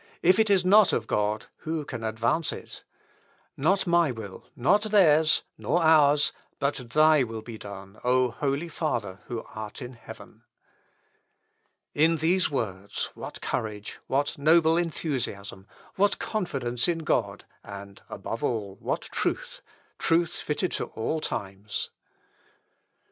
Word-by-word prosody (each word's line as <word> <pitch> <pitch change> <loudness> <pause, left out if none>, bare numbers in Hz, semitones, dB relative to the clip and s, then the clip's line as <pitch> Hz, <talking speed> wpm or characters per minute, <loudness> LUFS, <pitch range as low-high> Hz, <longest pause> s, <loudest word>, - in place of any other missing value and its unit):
If 185 +4 +5
it 220 -1 +4
is 190 -2 +4
not 205 +1 +6
of 115 - 0
God, 105 0 0
who 160 -1 -3
can 120 -5 -6
advance 115 +8 0
it?... - - -9 0.7
Not 190 +8 +2
my 170 -3 +4
will, 110 -6 -8
nor 145 +12 +4
theirs, 170 -8 +4 0.2
nor 175 - +1
ours, 150 -2 +5 0.3
but 140 +1 +1 0.2
Thy 155 +2 +5
will 115 -3 -3
be 115 -2 -8
done, 100 0 -10
O 125 0 +3
Holy 140 +6 -1
Father 120 - -3
who 120 -2 -4
art 110 -1 -6
in 125 -1 -7
heaven!" 115 - -13 1.5
In 160 +2 +4
these 175 +4 +2
words 100 -7 -3
what - - -8
courage, 105 -2 -4
what 140 +2 0
noble 160 +2 +5
enthusiasm, 130 - -3 0.3
what 200 +1 +3
confidence 130 - -2
in 165 -2 -1
God, - - 0 0.2
and, 100 -1 -10
above - - -5
all, 100 -5 -2
what - - -2
truth, - - -3 0.4
truth 170 0 +2
fitted 150 +4 -2
to - - -2
all 115 +8 -3
times! 100 -2 -4
140 Hz, 130 wpm, -27 LUFS, 110-165 Hz, 1.5 s, not